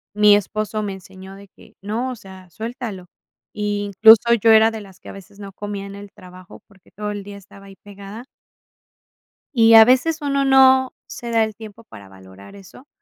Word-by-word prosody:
mi 210 Hz, -1 st, +5 dB
esposo 215 Hz, +1 st, -3 dB
me 205 Hz, -2 st, -5 dB
enseñó 190 Hz, 0 st, -13 dB
de 200 Hz, 0 st, -15 dB
que: -, -, -20 dB
"No, 220 Hz, +6 st, -4 dB
o 255 Hz, -, -6 dB
sea, 190 Hz, -4 st, -15 dB
suéltalo". 220 Hz, -1 st, -8 dB, 0.5 s
Incluso 210 Hz, +2 st, +3 dB
yo 225 Hz, -, +3 dB
era 220 Hz, 0 st, +5 dB
de 220 Hz, -1 st, -8 dB
las 195 Hz, -2 st, -16 dB
que -, -, -14 dB
a -, -, -8 dB
veces 195 Hz, 0 st, -15 dB
no 200 Hz, -1 st, -10 dB
comía 205 Hz, 0 st, -7 dB
en 200 Hz, -, -10 dB
el 200 Hz, 0 st, -12 dB
trabajo, 185 Hz, 0 st, -16 dB
porque, 195 Hz, -2 st, -25 dB
todo 210 Hz, 0 st, -7 dB
el 205 Hz, -1 st, -7 dB
día 200 Hz, 0 st, -11 dB
estaba 200 Hz, 0 st, -17 dB
ahí 195 Hz, -, -15 dB
pegada 205 Hz, +3 st, -12 dB, 1.3 s
y 225 Hz, -1 st, +5 dB
a 225 Hz, -, +9 dB
veces 260 Hz, +7 st, +1 dB
uno 280 Hz, -1 st, -1 dB
no 265 Hz, -1 st, +4 dB
se 235 Hz, -, -9 dB
da 225 Hz, -1 st, +2 dB
el 220 Hz, -1 st, -7 dB
tiempo 220 Hz, +1 st, -13 dB
para 100 Hz, -, -15 dB
valorar 95 Hz, -, -16 dB
eso, 200 Hz, +8 st, -17 dB
205 Hz, 195 wpm, -19 LUFS, 195-225 Hz, 1.3 s, a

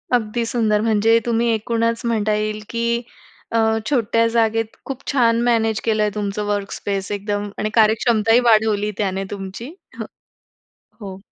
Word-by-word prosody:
अगदी 230 Hz, 0 st, -1 dB
सुंदर. 220 Hz, -3 st, +1 dB
म्हणजे 225 Hz, +1 st, +3 dB
तुम्ही 235 Hz, 0 st, +1 dB
एकूणच 230 Hz, +1 st, -1 dB
म्हणता 215 Hz, -2 st, 0 dB
येईल 215 Hz, 0 st, -2 dB
की 230 Hz, 0 st, -3 dB, 0.7 s
अ, 230 Hz, -, +1 dB, 0.3 s
छोट्या 230 Hz, -4 st, +2 dB
जागेत 225 Hz, -1 st, 0 dB
खूप 270 Hz, -1 st, -6 dB
छान 235 Hz, -4 st, +3 dB
मॅनेज 225 Hz, -2 st, +1 dB
केलंय 215 Hz, -2 st, +1 dB
तुमचं 210 Hz, 0 st, -3 dB
वर्कस्पेस 200 Hz, -1 st, -3 dB
एकदम 205 Hz, 0 st, -3 dB
आणि 215 Hz, -, -1 dB
कार्यक्षमताही 225 Hz, +1 st, +3 dB
वाढवली 215 Hz, -1 st, +2 dB
त्याने 195 Hz, -1 st, -1 dB
तुमची. 195 Hz, +5 st, -7 dB, 1.2 s
ह -, -, -36 dB
हो. 190 Hz, -1 st, -7 dB
220 Hz, 135 wpm, -20 LUFS, 210-230 Hz, 1.2 s, म्हणजे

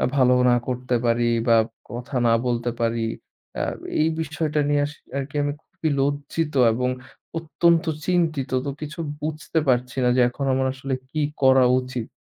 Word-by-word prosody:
ভালো 125 Hz, -2 st, +5 dB
না 120 Hz, -, +5 dB
করতে 125 Hz, 0 st, -1 dB
পারি 120 Hz, 0 st, +2 dB, 0.2 s
বা 115 Hz, -1 st, +6 dB, 0.3 s
কথা 125 Hz, +3 st, -6 dB
না 115 Hz, -, +4 dB
বলতে 120 Hz, 0 st, 0 dB
পারি, 115 Hz, 0 st, 0 dB, 0.6 s
আ -, -, 0 dB, 0.4 s
এই 155 Hz, -, +3 dB
বিষয়টা 155 Hz, -2 st, -1 dB
নিয়ে 145 Hz, 0 st, +3 dB
আস 145 Hz, -, -6 dB, 0.2 s
আরকি 140 Hz, +2 st, -5 dB
আমি 145 Hz, 0 st, -1 dB
খুবই 160 Hz, -, -4 dB
লজ্জিত 145 Hz, +2 st, -1 dB, 0.2 s
এবং 125 Hz, +2 st, 0 dB, 0.5 s
অত্যন্ত 165 Hz, +1 st, +2 dB, 0.2 s
চিন্তিত, 160 Hz, -7 st, 0 dB
তো -, -, -1 dB
কিছু 155 Hz, +2 st, -6 dB, 0.2 s
বুঝতে 155 Hz, +1 st, -2 dB
পারছি 125 Hz, 0 st, +1 dB
না 125 Hz, -, +4 dB
যে, -, -, +5 dB
এখন 135 Hz, +3 st, -4 dB
আমার 130 Hz, 0 st, +1 dB
আসলে 130 Hz, +1 st, -4 dB, 0.2 s
কি 155 Hz, -, -1 dB, 0.2 s
করা 130 Hz, -1 st, +6 dB, 0.2 s
উচিত। 125 Hz, -3 st, -5 dB
135 Hz, 160 wpm, -23 LUFS, 125-150 Hz, 0.6 s, বা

